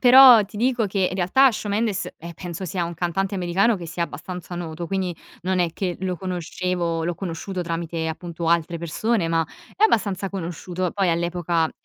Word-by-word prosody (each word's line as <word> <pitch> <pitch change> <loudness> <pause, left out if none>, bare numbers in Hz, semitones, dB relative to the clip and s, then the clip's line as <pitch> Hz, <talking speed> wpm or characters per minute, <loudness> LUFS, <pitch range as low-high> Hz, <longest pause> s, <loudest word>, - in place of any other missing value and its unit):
però 250 -3 +9
ti 205 +1 -12
dico 240 -1 +2
che, 195 -1 +1
in - - -5
realtà 240 +9 +5
Shawn 210 -1 -4
Mendes, 210 -3 0
eh, 170 +1 -8
penso 180 +1 -6
sia 175 0 -2
un 170 - -5
cantante 185 +4 -1
americano 190 +5 +2
che 170 - -7
sia 170 +1 -3
abbastanza 180 +1 -6
noto. 170 0 -5
Quindi 190 -3 -1 0.3
non 185 0 +1
è 175 -2 +2
che 180 0 -2
lo 185 -1 -1
conoscevo, 175 -1 -2
l'ho 175 +1 -1
conosciuto 180 +1 -4
tramite, 165 -1 -3
appunto, 170 0 -4
altre 170 0 +2
persone, 170 +3 0
ma 165 -1 +1 0.3
è 425 - +4
abbastanza 200 - +2
conosciuto. 180 -1 -3
Poi 195 -3 +1
all'epoca 170 -1 0
180 Hz, 180 wpm, -23 LUFS, 170-195 Hz, 0.3 s, però